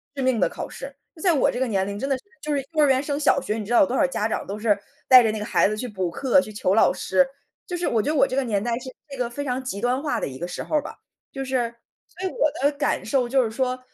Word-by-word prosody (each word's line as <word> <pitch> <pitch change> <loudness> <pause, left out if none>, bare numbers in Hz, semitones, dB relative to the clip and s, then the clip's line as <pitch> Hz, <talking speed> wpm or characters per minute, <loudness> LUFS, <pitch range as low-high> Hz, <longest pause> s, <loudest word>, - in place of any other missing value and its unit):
致 270 - -3
命 255 -3 +2
的 - - +3
考 - - -6
试。 275 +1 -9 0.2
就 315 - -13
在 355 -3 +4
我 280 - +3
这 245 - -4
个 260 - +1
年 195 -3 0
龄 200 0 -5
真 270 +2 -2
的 270 - +1
是， - - -18 0.2
就 300 0 -2
是 275 - 0
幼 305 -1 +4
儿 - - +5
园 265 0 +3
升 285 0 -2
小 280 -2 +3
学 215 - -2
你 210 - -4
知 240 - -3
道 240 - +6
有 - - +6
多 260 - -1
少 285 - +4
家 215 -4 -1
长 - - -3
都 200 +2 -4
是 210 -2 +2 0.3
带 255 -2 +9
着 220 - +2
那 215 - -4
个 - - -3
孩 - - +3
子 215 - -2
去 250 - -4
补 190 -5 -2
课、 270 +7 +3
去 215 - -9
求 195 -2 0
老 225 - +5
师， 270 +8 +2 0.4
就 355 - -3
是 350 - -1
我 225 -2 +2
觉 290 - -2
得 - - -1
我 275 0 +4
这 255 - -3
个 275 - +1
年 210 -4 -1
代 240 -1 -1
是 260 - -8 0.2
这 275 - -8
个 245 -1 -1
非 285 +4 -5
常 255 -1 -2
极 205 -5 -4
端 250 +3 +1
化 300 -1 -1
的 - - -2
一 130 -1 -8
个 175 - -3
时 180 - -5
候 - - -3
儿 - - +1
吧。 - - -9 0.3
就 270 -1 -4
是 245 -3 -1 0.3
所 375 +1 -5
以 - - -4
我 305 - +2
的 285 - +4
感 295 - 0
受 255 -4 +1
就 265 -1 +3
是 220 - -3
说， 255 +1 -1
255 Hz, 355 characters per minute, -24 LUFS, 220-275 Hz, 0.4 s, 带